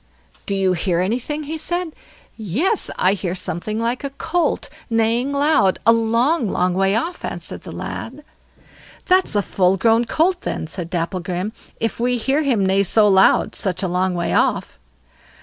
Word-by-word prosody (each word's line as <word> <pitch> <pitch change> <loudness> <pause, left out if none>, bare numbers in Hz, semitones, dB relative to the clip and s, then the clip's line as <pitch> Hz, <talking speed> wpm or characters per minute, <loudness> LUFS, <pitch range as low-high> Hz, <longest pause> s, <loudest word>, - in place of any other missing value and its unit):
"Do 200 - 0
you 190 -1 +2
hear 175 0 0
anything?" 250 +11 -2
he 315 +2 -4
said. 345 +1 -2 0.4
"Yes, 240 - -1
I 185 +2 +3
hear 185 -3 -3
something 185 +3 -3
like 235 +3 -2
a 280 - -2
colt 320 +4 -1 0.2
neighing 230 +3 +1
loud, 280 -9 +3
a 230 - +7
long 230 +5 +1
long 180 0 +1
way 195 +2 +2
off", 330 +11 -3
answered - - -6
the - - -9
lad. 270 +6 -6 0.8
"That's 370 - +2
a 205 - +2
full 185 0 +1
grown 225 +3 +3
colt 345 +9 +1
then", - - -3
said 170 +1 -6
Dapplegrim, 180 +3 -3 0.3
"if 225 -1 -2
we 245 +1 +1
hear 270 +6 +1
him 245 -10 +1
neigh 190 +1 +3
so 210 +2 +4
loud 190 -1 +4
such 185 -1 -2
a - - +1
long 180 +1 0
way 170 -1 -1
off." - - 0
220 Hz, 165 wpm, -20 LUFS, 185-275 Hz, 0.8 s, a